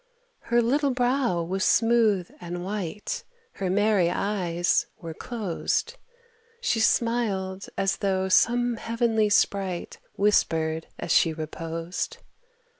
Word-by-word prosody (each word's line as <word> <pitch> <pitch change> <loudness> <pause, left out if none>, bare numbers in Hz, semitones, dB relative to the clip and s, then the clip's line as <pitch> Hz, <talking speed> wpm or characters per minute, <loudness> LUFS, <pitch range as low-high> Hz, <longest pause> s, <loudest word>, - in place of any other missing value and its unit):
Her 235 0 +3
little 280 +5 +2
brow 250 -7 +1
was 190 +3 -2
smooth 225 -6 +3
and 175 0 -5
white, 205 0 -4 0.3
Her 190 -2 -3
merry 200 -2 +3
eyes 175 -3 0
were 165 -2 -7
closed, 225 - -2 0.6
She 465 - 0
smiled, 210 -5 0
as 195 0 +1
though 190 -1 0
some 240 +4 +3
heavenly 225 -2 +1
sprite 195 -3 0 0.2
Whispered 160 -6 +1
as - - -4
she 165 - +4
reposed. 165 +2 -4
195 Hz, 110 wpm, -26 LUFS, 175-230 Hz, 0.6 s, she